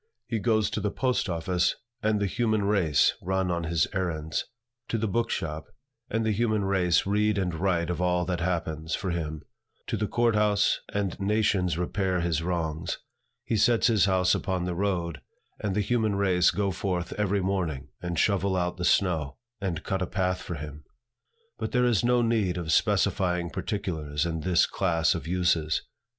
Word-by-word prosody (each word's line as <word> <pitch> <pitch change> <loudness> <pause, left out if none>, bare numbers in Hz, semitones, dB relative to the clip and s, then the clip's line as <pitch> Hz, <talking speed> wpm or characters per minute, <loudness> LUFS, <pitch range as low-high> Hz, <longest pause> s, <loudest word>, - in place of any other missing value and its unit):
He 115 - -2
goes 110 -2 +2
to 105 - -2
the 105 - 0
post 125 -2 0
office, 85 +1 0 0.3
and 110 -1 +1
the 100 - +1
human 110 +1 0
race 95 -7 +3
run 95 0 0
on 85 -1 -1
his 80 -2 +2
errands; 80 -5 -2 0.4
to 115 - -1
the 110 0 -1
book 115 +4 0
shop, 80 -3 -3 0.4
and 115 +1 0
the 110 - +2
human 110 -1 +1
race 90 -3 +2
read 105 +1 +2
and 90 -3 0
write 85 0 0
of 90 - -3
all 90 -1 +1
that 90 -1 -2
happens, 80 -2 -2
for 95 - -3
him; 80 -3 -3 0.4
to - - -2
the 105 - -1
court 120 +1 +2
house, 105 -1 +2
and 100 -3 -2
nations 100 -4 +1
repair 95 +1 0
his 85 -2 0
wrongs. 80 -2 -2 0.5
He - - 0
sets 115 +2 +3
his 110 -6 +4
house 95 -2 +3
upon 90 -2 -1
the 90 - -2
road, 85 -3 -1 0.4
and 100 -2 -2
the 105 - +2
human 110 -1 +1
race 95 -3 +3
go 100 -1 0
forth 90 0 -2
every 100 -1 +1
morning, 85 -8 -2
and 85 -1 -3
shovel 100 +1 +2
out 90 -1 -1
the 90 - -2
snow, 80 -8 +1 0.2
and 95 -6 -3
cut 95 -2 -2
a 95 - 0
path 90 -1 -1
for 85 - -5
him. 75 0 -8 0.8
But - - -3
there 125 -1 +3
is 120 -4 +2
no 120 0 +3
need 110 -6 +1
of 85 -2 -2
specifying 90 -1 +2
particulars 80 -8 -2
in 80 -1 -2
this 90 +1 +3
class 85 -5 +1
of - - -5
uses. 85 -3 +1
90 Hz, 180 wpm, -27 LUFS, 85-105 Hz, 0.8 s, his